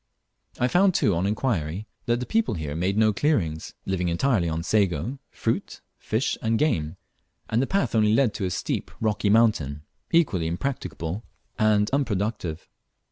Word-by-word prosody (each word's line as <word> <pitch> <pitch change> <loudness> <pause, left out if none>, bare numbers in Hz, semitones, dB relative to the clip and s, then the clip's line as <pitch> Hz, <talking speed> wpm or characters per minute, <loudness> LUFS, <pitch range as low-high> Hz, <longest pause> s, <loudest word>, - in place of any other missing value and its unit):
I 125 - +3
found 185 +5 +3
too 105 - +3
on 85 +3 0
inquiry 100 - -1 0.2
that 120 0 +2
the 125 - -3
people 220 - +1
here 75 -3 -4
made 95 +5 0
no 110 -1 +4
clearings, 95 - 0
living 90 -2 0
entirely 90 -1 +1
on 80 +1 -2
sago, 100 - 0
fruit, - - -2 0.2
fish, 110 +5 -1
and 115 0 +1
game; 80 - 0 0.5
and 115 - +3
the 135 - 0
path 175 - 0
only 105 -2 +4
led 120 -4 +3
to 100 - -3
a - - 0
steep - - -2
rocky 105 -2 +1
mountain 100 -11 +3 0.3
equally 105 - +2
impracticable 90 -2 -3 0.4
and 105 -2 +4
unproductive. 105 - -1
105 Hz, 155 wpm, -25 LUFS, 85-120 Hz, 0.5 s, no